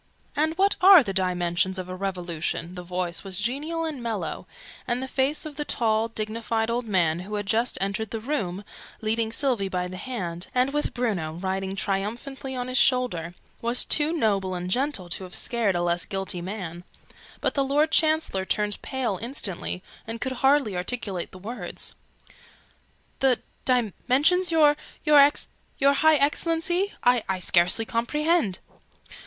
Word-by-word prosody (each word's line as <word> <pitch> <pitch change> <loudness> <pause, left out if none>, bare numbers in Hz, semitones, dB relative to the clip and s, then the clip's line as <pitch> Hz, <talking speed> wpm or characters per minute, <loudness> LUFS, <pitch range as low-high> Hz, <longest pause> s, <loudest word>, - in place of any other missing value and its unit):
"And 315 +2 0
what 395 +1 +3
are 370 -4 +9
the 195 -4 -3
dimensions 180 0 0
of 185 -1 -5
a 185 - -6
Revolution?" 180 -3 -3
The 180 - -7
voice 180 -1 -3
was 190 -1 -3
genial 300 +9 -2
and 300 -5 -5
mellow, 230 -3 -4 0.4
and 240 0 0
the 265 - -4
face 270 +4 0
of 300 -2 -8
the 295 - -1
tall 225 -5 +1
dignified 225 +1 -2
old 240 +1 -1
man, 175 -6 +1
who 200 +4 -6
had 205 0 -3
just 230 +4 +1
entered 200 +3 -2
the 225 - -4
room, 210 -7 -3 0.4
leading 220 +1 0
Sylvie 230 -6 +1
by 180 -1 -2
the 185 0 -8
hand, 180 -8 -5
and 255 +2 +2
with 295 0 -1
Bruno 200 -11 -1
riding 190 +2 -3
triumphantly 235 +8 -3
on 250 0 -3
his 255 +1 +2
shoulder, 180 -10 +1 0.3
was 235 +1 +4
too 300 +1 +5
noble 200 - 0
and 180 +1 -4
gentle 255 -6 0
to 180 - -1
have 185 0 -6
scared 230 -6 +1
a 175 - 0
less 175 0 +1
guilty 195 -2 -2
man: 180 -2 -6 0.6
but - - 0
the 275 - +1
Lord 295 +3 +2
Chancellor 310 - +2
turned 205 +1 -1
pale 255 -8 -2
instantly, 195 -7 -3 0.2
and 225 +1 -5
could 260 - -2
hardly 270 -7 +3
articulate 185 -1 -2
the - - -11
words 220 +7 -6 1.3
"The 265 -3 +3 0.3
dimensions 260 - +2
your 300 -2 +5 0.3
your 285 -1 +3
High 315 +2 +5
Excellency? 330 +6 +1
I 245 -2 +4
I 190 - +1
scarcely 180 +4 +3
comprehend!" 245 - 0
225 Hz, 160 wpm, -25 LUFS, 185-275 Hz, 1.3 s, are